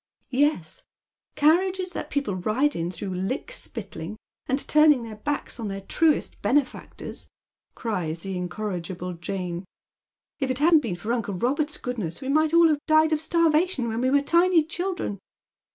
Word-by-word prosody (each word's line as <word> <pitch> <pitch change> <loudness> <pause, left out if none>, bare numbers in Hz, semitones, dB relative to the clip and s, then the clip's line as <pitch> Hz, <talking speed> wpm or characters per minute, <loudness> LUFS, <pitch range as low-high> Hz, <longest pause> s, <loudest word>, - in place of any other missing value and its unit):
" - - -44 0.2
Yes, 180 - -2 0.5
carriages 365 +4 +3
that - - -5
people 280 -8 -1
ride 225 +11 +1
in 170 +1 -2
through 185 +2 -5
lick 195 - -3
spittling, 215 - -5 0.3
and 265 - +1
turning 300 -4 +5
their 220 -2 -8
backs 290 +1 -3
on 225 - -3
their 195 0 -4
truest 310 +10 +1
benefactors," 260 +6 -2 0.5
cries 175 -8 -3
the 195 -1 -4
incor 185 +3 -3
rigible 180 0 -6
Jane. 180 -1 -3 0.4
" - - -68 0.3
If 270 -3 -1
it 255 - 0
hadn't 315 +2 +5
been 215 -10 -3
for 210 +7 -3
uncle 215 -5 -2
Robert's 290 - 0
goodness 215 -10 -4
we 265 - -5
might 310 +2 +3
all 335 0 +6
have 295 -1 0
died 315 0 +5
of 305 - 0
starvation 325 -5 +2
when 225 +1 -2
we 260 - +2
were 285 +1 +4
tiny 340 +2 +4
children. 350 - -3
255 Hz, 170 wpm, -25 LUFS, 195-310 Hz, 0.5 s, all